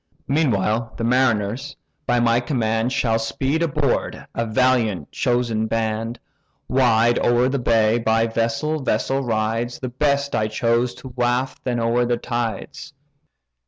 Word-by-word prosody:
Meanwhile 115 -6 +1
the - - -4
mariners, 120 +1 0 0.3
by 120 0 +2
my 120 0 +3
command, 115 -2 -1
Shall 115 -4 +1
speed 135 +7 -1
aboard, 165 -5 -1
a 115 0 -2
valiant 115 - +1
chosen 120 -3 0
band. 115 +1 -2 0.5
Wide 120 -2 +3
o'er 120 +1 +3
the 140 +1 -1
bay, 115 -1 +2
by 115 0 +2
vessel 115 +7 -1
vessel 135 +2 0
rides; 115 +1 -1
The 130 - -5
best 140 +2 0
I 110 -1 +1
choose 115 +3 0
to 130 - -10
waft 125 +1 -1
then 120 -2 -1
o'er 120 +1 +1
the 120 0 +1
tides." 120 +5 -4
120 Hz, 135 wpm, -22 LUFS, 115-130 Hz, 0.5 s, my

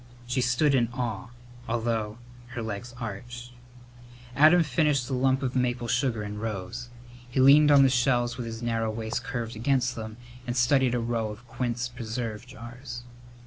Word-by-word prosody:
She 125 +2 0
stood 130 +4 +3
in 120 -3 +3
awe, 125 -1 -3 0.4
although 115 -2 -1 0.4
her 120 - -3
legs 110 +3 -6
ached. 120 +2 -7 0.8
Adam 160 +4 +7
finished 150 -3 +1
the 135 - -3
lump 130 +1 +2
of 130 -1 -2
maple 120 -1 0
sugar 125 -3 0
and 105 0 -6
rose. 115 +3 -5 0.4
He 130 - -1
leaned 145 +3 +7
on 140 -2 +7
the 135 - +5
shelves 120 -1 +2
with 120 -2 -5
his 115 +1 -6
narrow 115 -1 0
waist 110 +1 -3
curved 115 -2 -4
against 125 +1 +1
them 110 -1 -7 0.3
and 120 +1 -2
studied 125 0 +3
a - - +1
row 115 -1 -1
of 110 +3 -10
quince 120 0 -2
preserve 115 -1 -5
jars. 120 +1 -9
120 Hz, 165 wpm, -27 LUFS, 115-130 Hz, 0.8 s, Adam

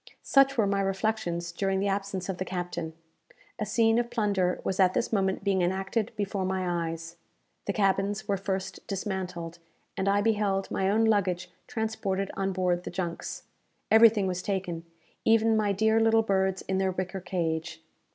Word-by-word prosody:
Such 275 -1 +4
were 220 - +4
my 200 0 +1
reflections 195 -3 -1
during 195 +2 0
the 200 - 0
absence 195 -2 -2
of 190 -2 -4
the - - 0
captain. 175 -3 -4 0.7
A 210 - -2
scene 225 +2 +3
of 240 0 -1
plunder 200 -6 +1
was 190 - -2
at 185 -1 +4
this 230 - 0
moment 190 -2 +1
being 195 -2 +2
enacted 195 +5 0
before 200 -2 -2
my 180 -3 -1
eyes. 165 +1 -7 0.5
The 200 - -1
cabins 195 0 +1
were 200 - +2
first 190 0 -4
dismantled; 180 -4 -4 0.4
and 190 +1 0
I 200 +1 +3
beheld 205 -3 +1
my 190 0 +1
own 220 +3 +3
luggage 195 -5 +1 0.2
transported 205 -4 -2
on 195 0 -1
board 180 -1 0
the - - -5
junks. 170 -3 -4 0.5
Everything 220 -2 +7
was 180 -1 -2
taken 180 -4 -3 0.4
even 225 0 +4
my 210 -2 +2
dear 220 +3 +3
little 225 0 +4
birds 190 -2 +1
in 190 0 -1
their 190 0 +1
wicker 185 +1 -3
cage. 160 -3 -3
195 Hz, 170 wpm, -28 LUFS, 180-210 Hz, 0.7 s, Everything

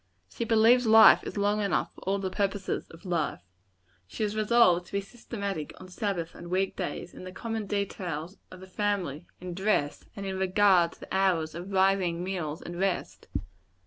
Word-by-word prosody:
She 235 - -3
believes 230 +2 +5
life 220 0 +8
is - - -6
long 205 +1 +1
enough 200 -3 0
for - - -16
all 195 +1 0
the 190 -1 -3
purposes 200 -1 -2
of 165 +3 -15
life. 170 - -1 0.7
She 215 - -4
is 210 0 -1
resolved 210 -5 +4
to - - -17
be 200 - +1
systematic 200 -6 -6
on 185 - -11
Sabbath 185 -4 -3
and - - -11
on - - -8
week 190 +1 0
days; - - -5
in - - -10
the 185 - -7
common 225 +1 -4
details 185 -3 -3
of 185 0 -12
the 190 - -10
family; 185 -6 -2
in 180 0 -6
dress; 190 -6 0
and 200 - -6
in 190 -1 -3
regard 190 -2 +4
to - - -21
the - - -5
hours 180 -5 +2
of 175 +4 -7
rising, 190 -3 +2
meals 175 -5 -4
and 175 0 -7
rest. 180 - -2
190 Hz, 190 wpm, -28 LUFS, 175-205 Hz, 0.7 s, life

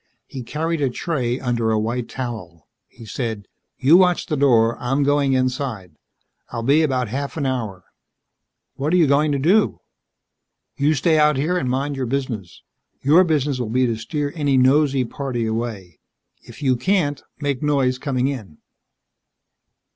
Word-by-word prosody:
He 130 - -8
carried 160 +6 -3
a 135 - +2
tray 125 -3 -2
under 120 -3 -1
a 110 - +2
white 115 +2 -2
towel. 110 - -7 0.2
He 115 - -14
said, 110 -3 -4 0.3
"You 145 +6 +6
watch 180 -2 +3
the 155 - -2
door. 120 -5 +3
I'm 135 +3 0
going 140 -1 +2
inside. 130 -7 -2 0.6
I'll 115 -1 -5
be 140 +6 +4
about 130 -6 0
a - - -11
half 140 +4 -4
an 145 - -1
hour." 110 -8 -3 0.9
"What 145 +5 -1
are - - +5
you 170 - +5
going 145 +2 +2
to 140 - +1
do?" 185 +10 +2 1.0
"You 150 +3 +2
stay 155 +3 +2
out 150 -2 +4
here 160 +7 0
and 130 -8 -1
mind 140 +3 -1
your 130 -2 -3
business. 120 -8 -4 0.4
Your 155 +7 +6
business 145 -5 0
will 120 -3 -3
be 130 +3 +2
to 115 -2 0
steer 145 +5 -4
any 145 -4 +1
nosey 135 0 +3
party 120 -2 -3
away. 110 -7 -4 0.4
If - - -12
you 130 -2 +3
can't, 145 -2 0 0.2
make 140 -3 -2
noise 135 -4 +1
coming 130 -2 -1
in." 110 - -6
135 Hz, 165 wpm, -21 LUFS, 120-145 Hz, 1.0 s, You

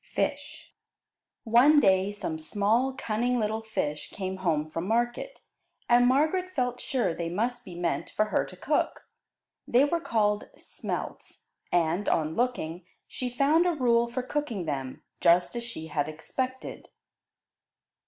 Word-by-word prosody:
FISH - - -3 0.7
One 255 +6 +6
day 190 -4 +3
some 170 -6 -4
small, 215 +10 +1
cunning 240 +3 0
little 220 0 -1
fish 150 -9 -3
came 190 -1 -4
home 160 -5 0
from 165 +3 -3
market, 240 - -1 0.5
and 245 0 +5
Margaret 315 +8 +1
felt 250 -2 -1
sure 250 -10 0
they 165 0 -3
must 235 +7 -2
be 180 - -10
meant 175 -1 -2
for 215 - +1
her 215 - +1
to - - -12
cook. - - -1 0.6
They 250 +4 +5
were 335 +4 0
called 210 -6 0
smelts, - - -6 0.3
and, 175 +3 +1
on 155 -1 +1
looking, 190 -9 -1 0.2
she 250 - -4
found 290 +8 +3
a 350 - +2
rule 235 -3 +3
for 250 +1 -3
cooking 250 - -3
them, 135 -4 -4 0.2
just 175 +6 +4
as 235 - -2
she 230 -9 -6
had 150 -2 -1
expected. 255 - -5
225 Hz, 145 wpm, -28 LUFS, 175-250 Hz, 0.7 s, One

